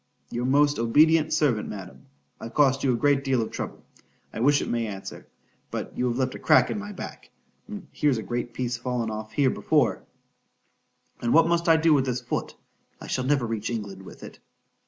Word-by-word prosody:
——Your 120 +1 -2
most 145 +1 +3
obedient 155 +7 +4
servant, 145 -9 +1
Madam—I've 115 +4 -11
cost 135 -2 +3
you 135 - +3
a - - +1
great 140 +2 +2
deal 135 -2 +1
of 110 - -2
trouble,—I - - -10
wish 145 +4 +4
it - - -3
may 115 -1 -1
answer;—but 100 -2 -9
you 125 - 0
have 120 0 -1
left 130 -1 0
a - - -8
crack 155 - +4
in - - -3
my 210 0 -7
back,—and 205 +1 -11
here's 145 -4 +1
a 110 - -4
great 120 0 -3
piece 120 0 -3
fallen 120 -2 -2
off 110 0 -7
here 135 +2 +3
before,—and 120 -1 -4
what 165 - +7
must 170 0 +1
I 165 - +7
do 160 0 +4
with 135 -2 +2
this 125 -1 -1
foot?——I 120 - -7
shall 130 - -2
never 135 -2 +2
reach 110 -2 -3
England 105 -5 -5
with 95 - -13
it. - - -11
130 Hz, 180 wpm, -25 LUFS, 115-145 Hz, -, what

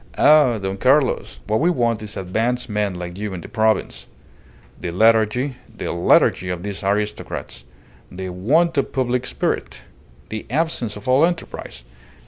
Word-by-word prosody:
"Ah, 150 -6 +5
Don 95 -1 -4
Carlos! 135 +5 +2
What 110 +1 +1
we 170 - +3
want 120 -9 +1
is 105 -1 -6
advanced 115 +7 -1
men 105 -3 -1
like 90 +1 -7
you 105 -2 -4
in 85 - -6
the - - -9
province. 110 -2 0 0.7
The 85 - -4
lethargy 115 +7 +2 0.2
the - - -3
lethargy 85 +1 +3
of 90 -1 -4
these 100 -1 -5
aristocrats! 105 -10 -3 0.5
The 95 +1 -6
want 145 - +2
of - - -2
public 125 -1 0
spirit! - - -3 0.5
The 110 0 -6
absence 130 -6 -1
of 105 +2 -10
all 130 +4 +4
enterprise! 165 - -3
110 Hz, 150 wpm, -21 LUFS, 95-130 Hz, 0.7 s, Ah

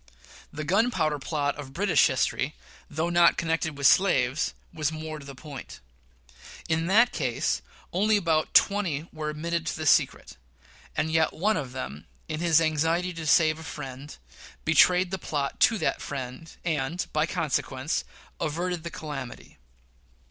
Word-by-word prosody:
The 155 - -5
gunpowder 170 -4 +1
plot 145 0 -1
of 135 -2 -8
British 195 +3 +4
history, 130 +2 -1 0.3
though 160 +3 -1
not 175 0 +5
connected 160 -2 -1
with 140 - -3
slaves, 135 -4 +3 0.2
was 155 -2 -1
more 155 -1 -6
in 140 -1 -10
point. 140 0 -9 0.9
In 160 +1 0
that 230 +6 +5
case, 125 - -1 0.3
only 210 +4 +3
about 165 -5 0
twenty 170 -7 +3
were 155 -1 -4
admitted 165 +2 -3
to - - -2
the 155 - -4
secret; 140 - +2 0.6
and 160 - 0
yet 160 0 +2
one 210 +6 +1
of 140 -6 -3
them, 75 - -6 0.2
in 155 - -4
his 165 -2 +4
anxiety 165 +3 +1
to 165 -2 -6
save 155 0 +4
a - - -9
friend, 140 -1 -8 0.5
betrayed 180 +3 +4
the 190 - -2
plot 145 -4 -3
to 225 - +5
that 160 - -1
friend, 135 +3 -6
and, 160 +1 -1
by 155 +1 +2
consequence, 135 -1 -1 0.4
averted 170 +3 -2
the 170 - -5
calamity. 145 -6 -8
155 Hz, 150 wpm, -27 LUFS, 145-170 Hz, 0.9 s, not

